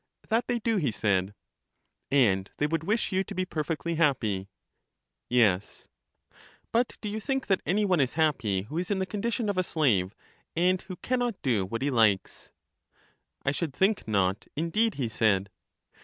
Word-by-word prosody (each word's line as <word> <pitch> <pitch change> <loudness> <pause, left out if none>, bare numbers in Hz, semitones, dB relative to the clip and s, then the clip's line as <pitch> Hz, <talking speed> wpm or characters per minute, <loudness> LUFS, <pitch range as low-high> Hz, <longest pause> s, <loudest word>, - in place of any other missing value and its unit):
That 225 +2 +1
they 245 - +1
do, 225 -1 0
he 150 -9 +1
said. 100 -2 0 0.7
And 100 -8 +3
they 150 - +1
would 160 +1 -1
wish 220 +4 0
you 190 0 +1
to - - -8
be 185 0 0
perfectly 165 0 -2
happy. 110 - +1 0.8
Yes. 105 -6 +1 0.8
But 235 +1 +1
do 215 - -4
you 210 +1 -3
think 270 +3 -2
that 190 -2 +1
any 205 +3 +2
one 185 -4 +2
is 130 -1 +1
happy 130 -12 +1
who 150 +11 -4
is 180 - -3
in 205 - +1
the 190 - 0
condition 225 +3 -2
of 200 -2 0
a - - +2
slave, 110 - +1 0.4
and 180 +2 +2
who 185 - -8
can 255 +7 -1
not 240 -5 -1
do 110 -8 +1
what 115 +6 -3
he 145 - +1
likes? 110 -6 +1 1.0
I 135 - +3
should 145 -2 -3
think 195 - +1
not 95 -2 0
indeed, 195 +8 +1
he 130 -4 -1
said. 100 -3 +1
155 Hz, 175 wpm, -28 LUFS, -, 1.0 s, And